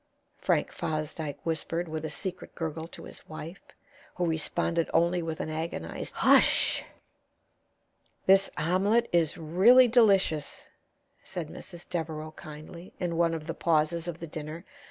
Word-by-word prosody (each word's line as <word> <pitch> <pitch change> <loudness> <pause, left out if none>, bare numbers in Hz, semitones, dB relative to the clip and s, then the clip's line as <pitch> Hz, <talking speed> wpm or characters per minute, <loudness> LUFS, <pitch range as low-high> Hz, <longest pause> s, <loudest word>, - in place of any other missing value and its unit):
Frank - - +1
Fosdyke 155 -1 -3
whispered 165 +1 -1
with 155 -1 -4
a 155 - -3
secret 185 +2 -5
gurgle 160 -1 -4
to - - -11
his - - -11
wife, 160 +4 -8 0.5
who 180 - 0
responded 165 +1 0
only 170 +1 +3
with 160 -1 -4
an 155 - -3
agonized 155 - -4
"Hush!" - - +4 1.4
"This 195 +1 +6
omelet 200 +8 +2
is 170 -2 +3
really 190 +11 +6
delicious," 195 - +3 0.6
said 175 -5 -5
Mrs. 175 +1 -9
Devereaux, 160 -2 -4
kindly, 155 +4 -11
in 175 -2 -1
one 165 0 +2
of 155 -1 -6
the 165 - -3
pauses 165 +1 +1
of 170 -2 -4
the 170 - -7
dinner. 155 +2 -7
165 Hz, 135 wpm, -28 LUFS, 155-175 Hz, 1.4 s, This